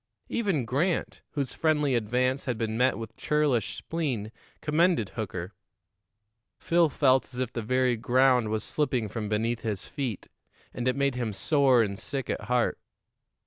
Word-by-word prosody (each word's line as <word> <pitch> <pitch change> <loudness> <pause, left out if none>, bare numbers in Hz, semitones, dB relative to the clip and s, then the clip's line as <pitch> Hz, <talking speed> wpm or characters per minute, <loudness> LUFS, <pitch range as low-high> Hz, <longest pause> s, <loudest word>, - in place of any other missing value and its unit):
Even 195 - 0
Grant, 155 - -1
whose 140 -3 -2
friendly 150 -4 +1
advance 125 +4 0
had 125 -3 -1
been 110 -1 -2
met 125 +3 +2
with 115 -2 -7
churlish 145 -8 +1
spleen, 130 -11 -3 0.3
commended 155 - +2
Hooker. 95 -4 -5 1.0
Phil 170 -1 +3
felt 130 -3 +2
as - - -5
if 125 -1 -2
the 115 - -2
very 125 +2 +2
ground 125 0 +3
was 110 0 -1
slipping 130 -7 0
from 105 -2 -4
beneath 115 +2 0
his 105 -3 -2
feet, 130 -9 -4 0.5
and 120 0 -3
it 130 - +2
made 140 -1 +1
him 120 -4 -2
sore 135 +1 +4
and 100 -2 -4
sick 135 -3 -3
at - - -4
heart. 125 +1 +1
125 Hz, 155 wpm, -28 LUFS, 110-140 Hz, 1.0 s, sore